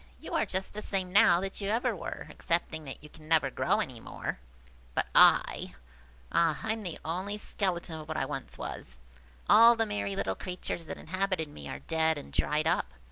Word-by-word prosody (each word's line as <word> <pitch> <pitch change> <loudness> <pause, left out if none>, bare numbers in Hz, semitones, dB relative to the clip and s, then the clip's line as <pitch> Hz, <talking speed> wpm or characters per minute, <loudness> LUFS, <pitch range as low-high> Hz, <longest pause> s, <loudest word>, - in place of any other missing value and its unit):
You - - -8
are - - +1
just 190 +1 -3
the 210 - -5
same 190 -3 -2
now 205 -4 +7
that 195 +2 -4
you 200 - -1
ever 230 +3 +1
were, - - -6
excepting 165 -3 -2
that 135 +1 -8
you 150 - -11
can 155 +1 -15
never 155 -4 +3
grow - - +1
any - - -5
more. - - -5 0.6
But - - +1
I! - - +5 0.6
ah, 165 -3 +3
I 220 - 0
am 220 -1 -6 0.2
only 185 +6 -2
the - - -10
skeleton 175 -5 -2
of 155 - -9
what 155 0 -3
I 135 - 0
once 135 0 -6
was! 65 0 -7 0.5
All 230 +2 +8
the 225 0 +1
merry 100 - -2
little 95 - 0
creatures 180 - -5
that - - -6
inhabited 185 -4 -2
me 145 - -9
are - - -4
dead 160 -1 +2
and 145 - -9
dried 150 +1 +1
up. 170 - +2
170 Hz, 200 wpm, -30 LUFS, 155-195 Hz, 0.6 s, All